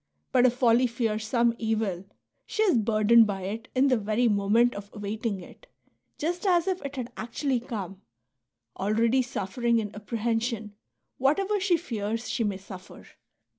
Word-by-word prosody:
But 255 -1 +5
if 245 - 0
folly 245 0 +4
fears 225 -3 -2
some 235 0 +2
evil, 215 -5 -1 0.4
she 435 - 0
is 360 - +4
burdened 220 +1 +5
by 195 -2 -3
it 220 +5 -5
in 260 +2 +4
the 255 -2 +3
very 215 +4 +1
moment 215 +3 +3
of 200 0 -8
awaiting 210 -1 -3
it, - - -15 0.5
just 345 +3 -2
as 350 -3 +3
if 375 -1 -1
it 280 0 -5
had 250 -2 -5
actually 245 +3 -1
come, 200 -6 -6 0.4
— 120 -1 -31
already 225 +5 +2
suffering 235 0 -1
in 210 -2 -2
apprehension 225 0 -2 0.5
whatever 390 +10 +2
she 370 -2 +2
fears 230 - -4
she 240 0 -1
may 205 -3 -1
suffer. 190 -1 -12
230 Hz, 160 wpm, -27 LUFS, 210-255 Hz, 0.5 s, But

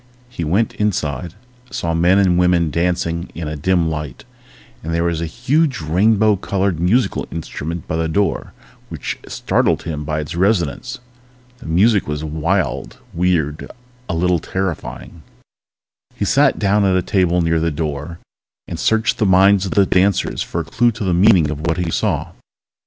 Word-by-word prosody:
He 105 -9 -5
went 95 +8 +1
inside, 85 -5 -2 0.3
saw 85 -6 -2
men 85 +3 +3
and 90 -3 +3
women 90 -3 +2
dancing 85 +1 -1
in 80 -2 -5
a 75 - -4
dim 85 +2 +1
light, 75 -5 -5 0.6
and 80 - -4
there 85 0 0
was 85 -1 -1
a 85 - -2
huge, 130 - 0
rainbow 100 +6 +3
colored 95 -3 -1
musical 105 +9 +1
instrument 80 0 -5
by 80 - -2
the 80 0 0
door 100 +5 -1 0.4
which - - -5
startled - - 0
him 75 -2 -4
by 75 +1 -2
its 75 - -5
resonance. 85 - 0 0.6
The 125 - -11
music 100 +6 +3
was 75 0 -3
wild, 80 -3 -2 0.2
weird, 80 -4 0 0.4
a - - -1
little 90 +1 +2
terrifying. 90 -1 -5 0.9
He - - -2
sat - - +3
down 100 +1 +2
at 95 -1 +3
a 90 - 0
table 90 -3 +1
near 80 0 +1
the 85 +1 0
door 75 +1 -4 0.5
and 85 - -6
searched 110 +2 +1
the 105 - +2
minds 95 +1 +5
of - - -3
the 100 -1 +4
dancers 95 +1 +1
for - - -3
a - - -7
clue 120 +1 +2
to 110 0 -5
the 95 -2 +1
meaning 90 -5 +4
of 75 +2 -4
what 85 - 0
he 90 -2 -2
saw. - - -1
85 Hz, 170 wpm, -19 LUFS, 80-100 Hz, 0.9 s, minds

